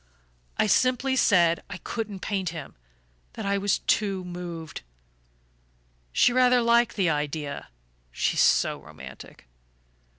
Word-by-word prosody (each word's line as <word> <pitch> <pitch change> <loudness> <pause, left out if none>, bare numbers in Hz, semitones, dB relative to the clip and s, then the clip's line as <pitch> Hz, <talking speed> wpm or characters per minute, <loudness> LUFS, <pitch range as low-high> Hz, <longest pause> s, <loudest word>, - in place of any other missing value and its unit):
I - - +3
simply 255 +4 +2
said 170 -9 +4
I 190 - -6
couldn't 210 -2 -5
paint 195 -4 -2
him, 160 -3 -8 0.6
that - - -6
I 200 0 +1
was 200 0 +1
too 195 -3 0
moved. 175 -3 -7 1.3
She 240 - +4
rather 250 -1 +4
liked 235 +1 +3
the 185 -5 +2
idea 145 - -3 0.4
she's - - 0
so - - +3
romantic! - - -12
195 Hz, 120 wpm, -26 LUFS, 165-235 Hz, 1.3 s, said